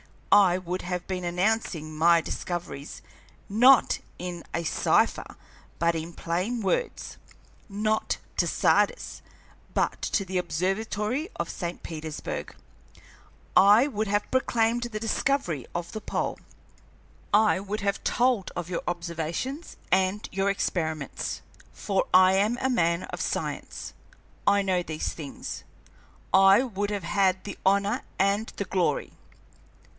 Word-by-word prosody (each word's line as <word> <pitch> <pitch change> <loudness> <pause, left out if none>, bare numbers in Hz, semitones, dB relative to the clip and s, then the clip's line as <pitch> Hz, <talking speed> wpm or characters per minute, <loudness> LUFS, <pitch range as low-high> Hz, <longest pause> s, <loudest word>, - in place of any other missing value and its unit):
I 195 -3 +6
would 185 0 -4
have 180 -1 -3
been 185 -2 -3
announcing 175 -4 -1
my 170 +2 +5
discoveries, 165 -4 -5 0.4
not 245 +5 +5 0.2
in 175 -1 -6
a 170 - -1
cipher, 160 - +1 0.4
but 170 0 +2
in 165 +1 -5
plain 185 +10 -2
words; 220 - -2 0.5
not 215 +2 0 0.2
to - - +2
Sardis, - - +1 0.5
but - - 0
to 200 - 0
the 185 0 -1
Observatory 210 - -1
at - - -1
St. 175 -1 -5
Petersburg. 155 -2 -5 1.0
I 210 +7 +7
would 220 -5 -2
have 205 +1 0
proclaimed 240 -2 +1
the 220 -3 -4
discovery 225 - 0
of 175 0 -3
the 215 - -6
pole, - - -2 0.9
I 210 -2 +4
would 205 +2 -4
have 200 0 -1
told 245 -5 +1
of 175 0 -4
your 175 - -2
observations 170 - -4 0.2
and 190 +2 +2
your 195 +1 +1
experiments; 160 -7 -2 0.3
for 195 -2 0
I 185 0 +7
am 210 +5 +2
a 265 - +1
man 170 -7 +1
of - - -6
science, - - -4 0.5
I 200 0 +5
know 185 -2 +1
these 155 -3 -3
things. 145 -4 -7 0.7
I 195 +4 +7
would 205 -5 -2
have 205 -3 -3
had 190 +1 +1
the 200 - -7
honor 200 +5 +2 0.2
and 200 +3 +2
the 200 - -3
glory. 180 -6 0
195 Hz, 130 wpm, -27 LUFS, 175-215 Hz, 1.0 s, I